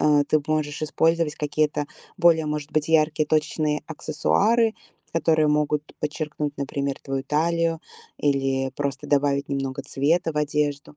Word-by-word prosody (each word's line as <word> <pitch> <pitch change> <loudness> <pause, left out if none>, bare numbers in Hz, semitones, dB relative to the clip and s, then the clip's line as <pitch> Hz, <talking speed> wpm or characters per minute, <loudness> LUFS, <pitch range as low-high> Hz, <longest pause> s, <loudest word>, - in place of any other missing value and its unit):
а, 145 -1 +4
ты 155 - +2
б 140 - -17
можешь 155 -1 -1
использовать 160 0 +1
какие-то 150 0 0 0.3
более, 165 -2 +4
может 150 0 -4
быть, 155 0 0
яркие 155 -1 +3
точечные 150 -1 0
аксессуары, 215 +9 +1 0.4
которые 160 -2 +3
могут 150 0 0
подчеркнуть, 150 -1 -3
например, 140 0 -2
твою 135 -1 -3
талию 165 +2 +1 0.4
или 135 -2 0
просто 140 -2 -3
добавить 140 -1 +1
немного 135 -1 -3
цвета 160 +4 0
в - - -11
одежду. 150 -1 -1
150 Hz, 135 wpm, -24 LUFS, 145-155 Hz, 0.4 s, а